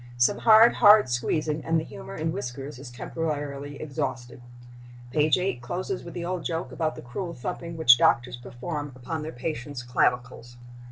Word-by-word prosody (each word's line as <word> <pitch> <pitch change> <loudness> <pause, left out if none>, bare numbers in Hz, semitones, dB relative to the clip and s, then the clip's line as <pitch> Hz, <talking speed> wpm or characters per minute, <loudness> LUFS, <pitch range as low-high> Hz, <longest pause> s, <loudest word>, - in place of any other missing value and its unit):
Some 120 - +3
hard, 225 +1 +7
hard 210 -7 +7
squeezing, 150 +5 -1
and 165 0 +1
the - - -4
humor - - -9
in 160 +1 -2
whiskers 135 -5 -6
is 135 -2 -9
temporarily 145 +1 -4
exhausted. 130 -5 -4 0.7
Page 155 +3 +3
8 180 -9 -2
closes 180 +9 -4
with 170 - -10
the 170 -1 -4
old 180 0 -3
joke 165 0 -3
about 155 -2 -2
the - - -10
cruel 170 +8 -5
thumping 170 +7 -6
which 120 -6 +7
doctors 120 +1 +3
perform 145 +4 -6
upon 150 +5 -5
their 155 +1 -5
patients' 125 -1 -5
clavicles. 125 0 -1
145 Hz, 165 wpm, -26 LUFS, 125-165 Hz, 0.7 s, hard